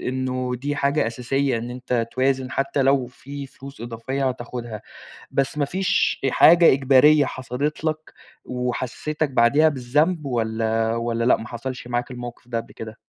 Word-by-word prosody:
إنه 130 Hz, 0 st, -2 dB
دي 145 Hz, +2 st, -2 dB
حاجة 140 Hz, -2 st, +1 dB
أساسية 125 Hz, +2 st, -1 dB
إن 120 Hz, +2 st, -5 dB
أنت 125 Hz, -2 st, -2 dB
توازن 130 Hz, 0 st, 0 dB
حتّى 135 Hz, +1 st, 0 dB
لو 135 Hz, -1 st, +3 dB
في 140 Hz, +3 st, -9 dB
فلوس 135 Hz, -1 st, -12 dB
إضافية 125 Hz, +4 st, -2 dB
هتاخُدها، 120 Hz, -3 st, -6 dB, 0.5 s
بس 135 Hz, +2 st, 0 dB
ما 145 Hz, -, +2 dB
فيش 190 Hz, +5 st, 0 dB
حاجة 170 Hz, +3 st, +7 dB
إجبارية 140 Hz, +2 st, +5 dB
حصلِت 130 Hz, +5 st, -3 dB
لك 155 Hz, 0 st, -3 dB, 0.3 s
وحسِّستك 125 Hz, +5 st, -2 dB
بعديها 140 Hz, +6 st, +4 dB
بالذنب 150 Hz, +5 st, 0 dB
والّا 115 Hz, -2 st, 0 dB
والّا 115 Hz, 0 st, -1 dB
لأ 125 Hz, -, +4 dB
ما 110 Hz, -, -8 dB
حصلش 125 Hz, +1 st, -6 dB
معاك 120 Hz, +1 st, -2 dB
الموقِف 120 Hz, -1 st, -8 dB
ده 120 Hz, -2 st, -2 dB
قبل 115 Hz, -, -11 dB
كده؟ 110 Hz, 0 st, -9 dB
130 Hz, 150 wpm, -23 LUFS, 120-140 Hz, 0.5 s, حاجة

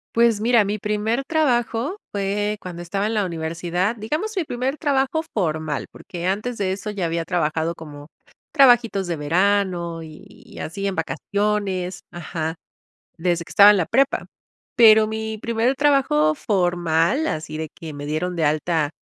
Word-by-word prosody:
Pues 230 Hz, -3 st, +3 dB
mira, 235 Hz, -1 st, +4 dB
mi 205 Hz, +1 st, -2 dB
primer 210 Hz, +5 st, -1 dB
trabajo 270 Hz, -, 0 dB
fue 205 Hz, +1 st, -1 dB
cuando 175 Hz, -1 st, -7 dB
estaba 195 Hz, +4 st, -1 dB
en 225 Hz, -, -2 dB
la 205 Hz, -2 st, +1 dB
universidad, 170 Hz, +4 st, -2 dB
digamos 305 Hz, -, -3 dB
mi 365 Hz, -, +1 dB
primer 260 Hz, +1 st, -3 dB
trabajo 285 Hz, +1 st, 0 dB
formal, 155 Hz, -6 st, -2 dB
porque 175 Hz, 0 st, -6 dB
antes 215 Hz, +5 st, -2 dB
de 190 Hz, -2 st, 0 dB
eso 200 Hz, +2 st, -4 dB
ya 190 Hz, -5 st, -2 dB
había 165 Hz, 0 st, -2 dB
trabajado 165 Hz, -2 st, 0 dB
como, 145 Hz, -2 st, -11 dB, 0.4 s
trabajitos 240 Hz, -, +4 dB
de 170 Hz, -, -1 dB
verano 170 Hz, +1 st, 0 dB
y 155 Hz, -1 st, -13 dB
así 195 Hz, +5 st, -5 dB
en 195 Hz, -, 0 dB
vacaciones 185 Hz, +3 st, -2 dB
ajá, 165 Hz, -2 st, -4 dB, 0.7 s
desde 170 Hz, 0 st, 0 dB
que -, -, -17 dB
estaba 205 Hz, +1 st, +8 dB
en -, -, +2 dB
la 180 Hz, -, +1 dB
prepa. 270 Hz, -, +1 dB, 0.5 s
Pero 220 Hz, -2 st, +7 dB
mi 220 Hz, 0 st, -4 dB
primer 230 Hz, +4 st, 0 dB
trabajo 260 Hz, -, +3 dB
formal, 175 Hz, -, +1 dB
así 155 Hz, -, -4 dB
de 160 Hz, 0 st, -4 dB
que 160 Hz, -2 st, -7 dB
me 145 Hz, 0 st, -7 dB
dieron 160 Hz, +4 st, -2 dB
de 165 Hz, -2 st, 0 dB
alta 155 Hz, +1 st, +1 dB
195 Hz, 160 wpm, -22 LUFS, 165-225 Hz, 0.7 s, estaba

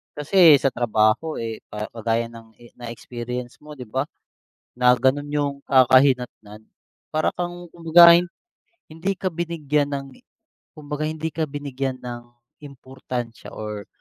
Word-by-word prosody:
Kasi 160 Hz, +1 st, +6 dB
sa 135 Hz, -, +2 dB
trabaho 120 Hz, +6 st, +1 dB
eh, 115 Hz, -1 st, -5 dB
pa 105 Hz, 0 st, -6 dB
kagaya 115 Hz, 0 st, -1 dB
ng 115 Hz, -1 st, -14 dB
e 120 Hz, 0 st, -18 dB
na-experience 120 Hz, +1 st, -7 dB
mo 150 Hz, 0 st, -12 dB
di 130 Hz, -, -8 dB
ba? 130 Hz, +6 st, -2 dB, 0.7 s
Na 125 Hz, 0 st, +5 dB
ganun 130 Hz, +4 st, +1 dB
yung 145 Hz, -1 st, 0 dB
kakahinatnan. 125 Hz, -5 st, +3 dB, 0.5 s
Para 155 Hz, 0 st, 0 dB
kang 175 Hz, 0 st, -5 dB
kumbaga 170 Hz, 0 st, +7 dB
eh, 170 Hz, -, +4 dB, 0.7 s
hindi 170 Hz, +5 st, -3 dB
ka 185 Hz, +1 st, -2 dB
binigyan 155 Hz, -4 st, -1 dB
ng, 135 Hz, 0 st, -4 dB, 0.7 s
kumbaga 150 Hz, 0 st, -5 dB
hindi 160 Hz, +1 st, -3 dB
ka 160 Hz, +1 st, -2 dB
binigyan 135 Hz, -2 st, -4 dB
ng 120 Hz, -1 st, -7 dB, 0.4 s
importansya 130 Hz, -3 st, -8 dB
or, 105 Hz, -1 st, -6 dB
135 Hz, 135 wpm, -23 LUFS, 120-155 Hz, 0.7 s, kumbaga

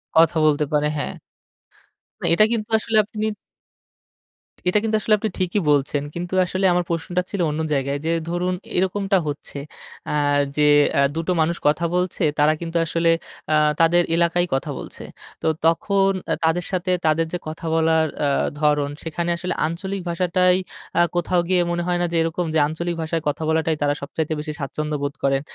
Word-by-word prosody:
কথা 165 Hz, +1 st, +5 dB
বলতে 150 Hz, 0 st, +3 dB
পারে 150 Hz, 0 st, +2 dB
হ্যাঁ। 145 Hz, -, -3 dB, 1.1 s
না -, -, -5 dB
এটা 215 Hz, +5 st, +6 dB
কিন্তু 220 Hz, -3 st, -2 dB
আসলে 220 Hz, 0 st, 0 dB
আপনি 215 Hz, +1 st, -4 dB, 1.4 s
এটা 180 Hz, -, +3 dB
কিন্তু 220 Hz, -1 st, 0 dB
আসলে 215 Hz, -, +2 dB
আপনি 220 Hz, -, -1 dB
ঠিকই 185 Hz, +2 st, 0 dB
বলছেন। 145 Hz, 0 st, +1 dB
কিন্তু 175 Hz, +1 st, -5 dB
আসলে 185 Hz, +2 st, -1 dB
আমার 180 Hz, 0 st, +1 dB
প্রশ্নটা 170 Hz, +2 st, -1 dB
ছিল 200 Hz, -, -2 dB
অন্য 150 Hz, +1 st, -2 dB
জায়গায় 140 Hz, 0 st, -1 dB
যে, 165 Hz, -, +1 dB, 0.2 s
ধরুন 180 Hz, +1 st, -1 dB, 0.2 s
এরকমটা 195 Hz, +1 st, +1 dB
হচ্ছে 145 Hz, -1 st, -5 dB, 0.5 s
আ -, -, 0 dB, 0.4 s
যে, 150 Hz, 0 st, +4 dB, 0.2 s
অ্যা 140 Hz, -, +3 dB
২ -, -, -1 dB
টো -, -, +2 dB
মানুষ 170 Hz, +2 st, +1 dB
কথা 155 Hz, +3 st, +2 dB
বলছে 180 Hz, -1 st, -1 dB, 0.2 s
তারা 150 Hz, +1 st, +5 dB
কিন্তু 165 Hz, 0 st, -6 dB
আ -, -, +1 dB
আসলে 165 Hz, 0 st, +2 dB, 0.7 s
তাদের 175 Hz, +1 st, +5 dB
এলাকায়ই 170 Hz, +1 st, +2 dB
কথা 135 Hz, -, -2 dB
বলছে। -, -, -9 dB, 0.4 s
তো -, -, +1 dB, 0.2 s
তখন 195 Hz, +4 st, +3 dB, 0.2 s
অ্যা -, -, +1 dB
তাদের 165 Hz, +2 st, +1 dB
সাথে 185 Hz, -1 st, -1 dB
তাদের 160 Hz, +1 st, +3 dB
যে, -, -, 0 dB
কথা 155 Hz, +1 st, -7 dB
বলার 160 Hz, 0 st, +3 dB, 0.2 s
আ -, -, +2 dB, 0.3 s
ধরন 150 Hz, -1 st, +2 dB
সেখানে 170 Hz, +2 st, -3 dB
আসলে 180 Hz, +1 st, -3 dB
আঞ্চলিক 190 Hz, +4 st, -4 dB
ভাষাটাই 180 Hz, +1 st, +2 dB, 0.4 s
আ -, -, +6 dB
কোথাও 175 Hz, +1 st, +1 dB
গিয়ে 185 Hz, -1 st, +3 dB
মনে 175 Hz, 0 st, -1 dB
হয় 175 Hz, 0 st, +1 dB
না -, -, +2 dB
যে, -, -, -2 dB
এরকম? 165 Hz, +2 st, -1 dB
যে, -, -, +4 dB
আঞ্চলিক 170 Hz, +3 st, -3 dB
ভাষায় 160 Hz, +1 st, -2 dB
কথা 145 Hz, +2 st, -1 dB
বলাটাই 160 Hz, 0 st, +1 dB
তারা 145 Hz, 0 st, +2 dB
সবচাইতে 155 Hz, +2 st, -3 dB
বেশি 155 Hz, 0 st, -5 dB
স্বাচ্ছন্দ্য 150 Hz, +2 st, -3 dB
বোধ 140 Hz, 0 st, -2 dB
করেন? 135 Hz, 0 st, +2 dB
170 Hz, 180 wpm, -22 LUFS, 155-180 Hz, 1.4 s, এটা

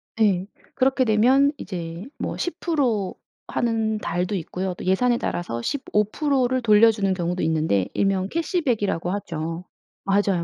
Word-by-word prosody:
네. 200 Hz, -5 st, +2 dB, 0.3 s
그렇게 265 Hz, 0 st, +2 dB
되면 255 Hz, +6 st, +4 dB
이제 170 Hz, -2 st, -6 dB
뭐 -, -, -4 dB
10% 280 Hz, -, -1 dB, 0.3 s
하는 225 Hz, -2 st, 0 dB
달도 180 Hz, -1 st, -2 dB
있고요. 180 Hz, +1 st, -3 dB
또 -, -, -8 dB
예산에 235 Hz, +6 st, +3 dB
따라서 145 Hz, -, -3 dB
15% 260 Hz, -, 0 dB
를 255 Hz, +1 st, 0 dB
돌려 225 Hz, 0 st, +6 dB
주는 200 Hz, -3 st, 0 dB
경우도 180 Hz, -1 st, -2 dB
있는데 155 Hz, -, +1 dB
일명 195 Hz, -1 st, +1 dB
캐시백이라고 240 Hz, -, 0 dB
하죠. 165 Hz, -3 st, -4 dB, 0.4 s
맞아요, 195 Hz, -3 st, +2 dB
205 Hz, 270 characters per minute, -23 LUFS, 180-245 Hz, 0.4 s, 돌려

